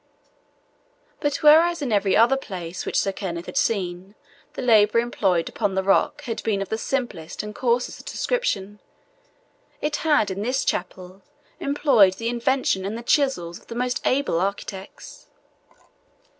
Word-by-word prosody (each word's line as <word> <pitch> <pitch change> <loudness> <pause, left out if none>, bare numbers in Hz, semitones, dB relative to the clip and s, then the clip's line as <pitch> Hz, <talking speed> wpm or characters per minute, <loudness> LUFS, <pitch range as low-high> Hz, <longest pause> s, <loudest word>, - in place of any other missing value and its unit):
But 290 0 -2
whereas, 330 +3 +6
in 255 - -2
every 200 -2 +2
other 235 +4 +5
place 180 -9 -6
which - - -1
Sir 195 - 0
Kenneth 175 -3 -5
had - - -9
seen, 190 -1 -1 0.4
the - - -5
labour 220 -2 +4
employed 195 -8 +1
upon 195 -2 -2
the 190 - 0
rock 200 +9 +1
had 235 -5 -4
been 210 -3 0
of 195 - -4
the 220 - -1
simplest 235 -13 -3
and 210 0 -7
coarsest 245 +1 -1
description, 210 - -2 1.0
it 300 0 -1
had 295 -11 +2
in 190 +1 -4
this 250 +5 -1
chapel 185 +1 -4 0.4
employed 275 -9 +4
the 230 +3 -3
invention 240 -4 0
and 205 +4 -4
the 235 - -8
chisels 235 - 0
of - - -24
the 230 - -7
most 250 +1 -1
able 260 -10 +1
architects. 195 0 -6
215 Hz, 150 wpm, -23 LUFS, 190-260 Hz, 1.0 s, whereas